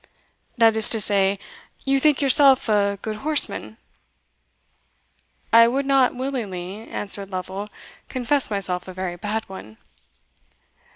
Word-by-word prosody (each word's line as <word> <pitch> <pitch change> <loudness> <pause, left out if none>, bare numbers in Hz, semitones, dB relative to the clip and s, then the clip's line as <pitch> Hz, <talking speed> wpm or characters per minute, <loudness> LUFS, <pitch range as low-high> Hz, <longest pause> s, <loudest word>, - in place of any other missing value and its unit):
"That 225 -1 +4
is 220 -1 +5
to 225 - +1
say, 200 -1 +1 0.5
you 275 0 +2
think 295 0 +2
yourself 275 -1 +4
a 200 -2 +1
good 215 -1 -4
horseman?" 300 +5 0 1.8
"I 230 0 +8
would 270 +4 -1
not 270 -2 +2
willingly," 220 -6 -6
answered 200 -1 0
Lovel, 190 +2 -6 0.4
"confess 260 +2 -1
myself 190 -3 -4
a 185 - -8
very 185 -1 -5
bad 210 +5 -4
one." 110 - -11
215 Hz, 120 wpm, -22 LUFS, 195-260 Hz, 1.8 s, I